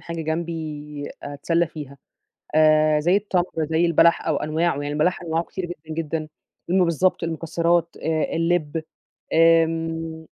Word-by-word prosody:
حاجة 170 -1 -5
جنبي 155 -3 -4
أتسلى 165 +4 0
فيها 150 -4 -9 0.6
آآ 155 -1 +4
زي 175 +5 +3
التمر، 195 -4 +1 0.3
زي 165 +2 +3
البلح 170 0 +4
أو 155 -3 +1
أنواعه 160 +3 0
يعني 145 - -3
البلح 180 +5 0
أنواعه 165 0 -1
كتيرة 185 -2 -5 0.2
جدًا، 160 +1 -3
جدًا 155 0 -4 0.4
الم 185 0 +4
بالضبط 170 +2 +1
المكسرات 170 +1 0
آآ 160 0 -1
اللِب 165 -2 0 0.5
آمم 165 0 +2
165 Hz, 135 wpm, -23 LUFS, 155-170 Hz, 0.6 s, آآ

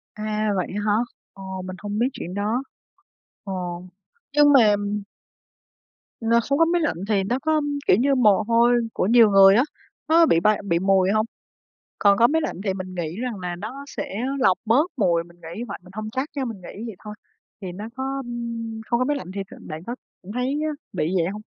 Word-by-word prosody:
À, 215 0 -1
vậy 185 - -1
á 205 - -1
hả? 210 - +3 0.4
Ồ, 190 -1 -7
mình 185 0 -6
hông 205 +1 -3
biết 240 - +3
chuyện 180 -8 -6
đó. 215 +6 -1 0.8
Ồ, 180 -3 -4 0.5
nhưng 290 0 +6
mà 220 -7 +6 1.5
N - - 0 0.2
không 280 - +2
có 330 - +6
máy 345 +1 +1
lạnh 300 - 0
thì 200 -3 +2
nó 240 +7 -1
có 310 +1 +1 0.3
kiểu - - +6
như 275 +2 +3
mồ 215 -6 +4
hôi 235 +1 +4 0.2
của - - 0
nhiều 230 -1 +6
người 195 0 +7
á, 240 - +5 0.5
nó 330 +1 +6
bị 165 - +4
bay 210 +4 +2
bị 170 -2 +2
mùi 190 0 +3
hông? 215 +1 +2 0.7
Còn 200 -1 +5
có 235 - +6
máy 320 +4 +1
lạnh - - -3
thì 195 -3 0
mình 185 -1 -6
nghĩ 170 -2 -3
rằng 245 -5 -3
là 180 -1 -4
nó 235 +10 -7
sẽ 195 - -6 0.2
lọc 190 -8 +4
bớt 270 +11 +3
mùi, 175 -6 +2
mình 170 0 -19
nghĩ 170 +8 -6
vậy, 200 - -5
mình 185 - -15
hông 215 0 -4
chắc 260 +6 -2
nha, 275 -2 -1
mình 225 -6 -6
nghĩ 200 +4 -9
vậy 220 - -7
thôi, 210 -1 -7 0.5
thì 190 - -5
nó 200 +4 -7
có 270 +1 -3 0.7
không 235 - +1
có 255 - +2
máy 290 +1 0
lạnh 185 -9 -8
thì 200 - -2
tự - - -10
bạn 155 +1 -8
có 240 +6 -5 0.4
thấy 250 +1 -1 0.5
bị 170 -1 -1
vậy 170 -1 +1
hông? 210 - -7
210 Hz, 210 wpm, -23 LUFS, 185-250 Hz, 1.5 s, người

